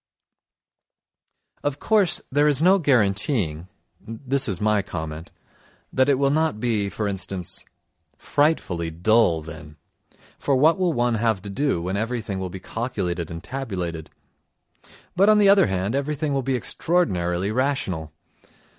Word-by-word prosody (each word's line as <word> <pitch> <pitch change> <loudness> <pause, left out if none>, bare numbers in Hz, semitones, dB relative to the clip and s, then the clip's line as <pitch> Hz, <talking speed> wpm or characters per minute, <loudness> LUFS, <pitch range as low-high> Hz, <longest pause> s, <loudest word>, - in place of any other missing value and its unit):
Of 145 -1 -1
course 205 0 +2
there 145 +2 +3
is 145 -3 +3
no 185 +4 +5
guaranteeing 100 - +1 0.3
(this 130 +4 -1
is 100 -5 -2
my 105 -1 +2
comment) 80 -3 -6 0.6
that 130 +2 +3
it 140 - +5
will 140 0 +2
not 155 -7 0
be, 110 -4 0
for 105 +2 -3
instance, 95 -2 -4 0.5
frightfully 95 - 0
dull 85 -1 +2
then 75 -1 -10 0.6
(for 140 - +1
what 160 +8 +4
will 180 -2 +2
one 120 -3 +1
have 110 -4 +1
to 100 - -6
do 135 -6 0
when 95 +3 -2
everything 110 -3 -3
will 95 -1 -4
be 95 +2 -8
calculated 90 -6 -3
and 85 +1 -7
tabulated), 95 - -5 1.1
but 195 +4 +4
on 215 - +6
the 205 -1 +5
other 200 - +6
hand 95 +3 -1
everything 145 +1 -1
will 135 - +1
be 130 +1 -1
extraordinarily 95 - 0
rational. 110 - -1
110 Hz, 140 wpm, -23 LUFS, 90-140 Hz, 1.1 s, on